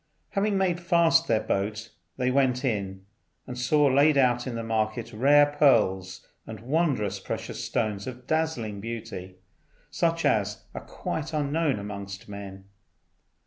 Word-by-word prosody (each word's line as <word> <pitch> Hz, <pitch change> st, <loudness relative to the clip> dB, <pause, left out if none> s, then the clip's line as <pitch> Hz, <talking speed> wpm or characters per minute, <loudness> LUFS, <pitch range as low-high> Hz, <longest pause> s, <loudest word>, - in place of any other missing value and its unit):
Having 200 Hz, 0 st, 0 dB
made 180 Hz, -3 st, +1 dB
fast 170 Hz, -2 st, +3 dB
their 110 Hz, -2 st, +1 dB
boat 105 Hz, +3 st, -2 dB, 0.3 s
they 125 Hz, 0 st, +1 dB
went 130 Hz, -1 st, +2 dB
in, 95 Hz, -5 st, -2 dB, 0.4 s
and 125 Hz, -, -7 dB
saw 140 Hz, +4 st, +2 dB
laid 140 Hz, +2 st, +4 dB
out 125 Hz, -2 st, +2 dB
in 125 Hz, -, -4 dB
the 115 Hz, -, -3 dB
market 115 Hz, +1 st, -2 dB
rare 145 Hz, +6 st, +5 dB
pearls 95 Hz, -10 st, +2 dB, 0.2 s
and 110 Hz, -2 st, -7 dB
wondrous 120 Hz, -, 0 dB
precious -, -, -5 dB
stones 105 Hz, -2 st, -2 dB
of 125 Hz, -1 st, -8 dB
dazzling 155 Hz, -10 st, -1 dB
beauty, 110 Hz, -5 st, -7 dB, 0.6 s
such 165 Hz, -1 st, 0 dB
as 105 Hz, -1 st, +1 dB
are -, -, -6 dB
quite 160 Hz, 0 st, -5 dB
unknown 150 Hz, -2 st, 0 dB
amongst 100 Hz, -1 st, -7 dB
men. 100 Hz, -1 st, -9 dB
120 Hz, 140 wpm, -26 LUFS, 105-145 Hz, 0.6 s, rare